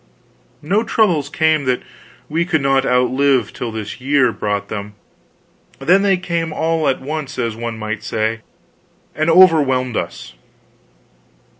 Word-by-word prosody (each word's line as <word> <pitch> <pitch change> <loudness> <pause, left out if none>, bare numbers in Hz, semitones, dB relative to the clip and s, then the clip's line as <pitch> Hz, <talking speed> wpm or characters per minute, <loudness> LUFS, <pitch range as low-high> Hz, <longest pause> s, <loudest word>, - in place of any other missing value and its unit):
No 195 +8 +1
troubles 180 -11 +1
came 155 -1 +1
that 125 -1 0 0.4
we 165 +3 0
could 165 -5 0
not 135 0 +2
outlive, 125 -1 +2
till 120 - -5
this 110 +2 -7
year 135 -2 +2
brought 105 -2 -3
them; 105 0 -6 0.8
then 180 +8 +3 0.2
came 170 -2 -2
they 155 - -7
all 160 -1 0
at 135 - +1
once, 150 +1 -5
as 115 -3 -2
one 115 0 -5
might 110 -1 -4
say, 110 +1 -2 0.7
and 155 +2 0
overwhelmed 145 -9 +4
us. 65 - -5
135 Hz, 135 wpm, -18 LUFS, 115-160 Hz, 0.8 s, overwhelmed